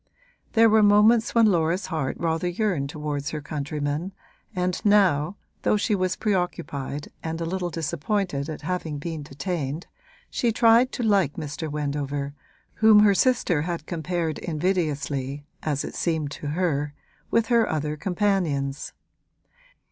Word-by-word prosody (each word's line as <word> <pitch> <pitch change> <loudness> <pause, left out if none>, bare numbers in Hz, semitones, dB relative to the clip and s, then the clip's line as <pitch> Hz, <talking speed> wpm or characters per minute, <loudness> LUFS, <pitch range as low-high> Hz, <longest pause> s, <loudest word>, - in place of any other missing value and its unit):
There 225 0 +6
were 220 0 +5
moments 215 +3 +5
when 230 -1 +6
Laura's 175 -1 +2
heart 155 -7 -2
rather 165 +1 0
yearned 175 -6 -1
towards 150 -1 -3
her 155 - -4
countrymen, 150 +4 -3 0.4
and 180 0 -1
now, 190 -5 +3 0.3
though - - +2
she 210 +1 0
was 185 -2 +1
preoccupied 170 -8 -2
and 165 0 -4
a 165 - -2
little 180 +1 -2
disappointed 165 -1 -2
at 155 - -6
having 165 -3 -3
been 160 +1 -5
detained, 145 +2 -4 0.5
she 235 - +1
tried 230 +2 +5
to 245 - -3
like 195 - +3
Mr. 155 +1 -5
Wendover, 145 -1 -3 0.4
whom 220 -1 +6
her 205 -1 +6
sister 195 - +2
had 165 -1 -3
compared 165 -1 -2
invidiously, 150 -5 -2 0.2
as 145 -2 -1
it - - -7
seemed 160 -4 -1
to 145 - -6
her, 150 -3 -1 0.3
with 230 0 +2
her 235 -2 +3
other 150 -1 -1
companions. 170 -6 -1
165 Hz, 140 wpm, -25 LUFS, 145-195 Hz, 0.5 s, There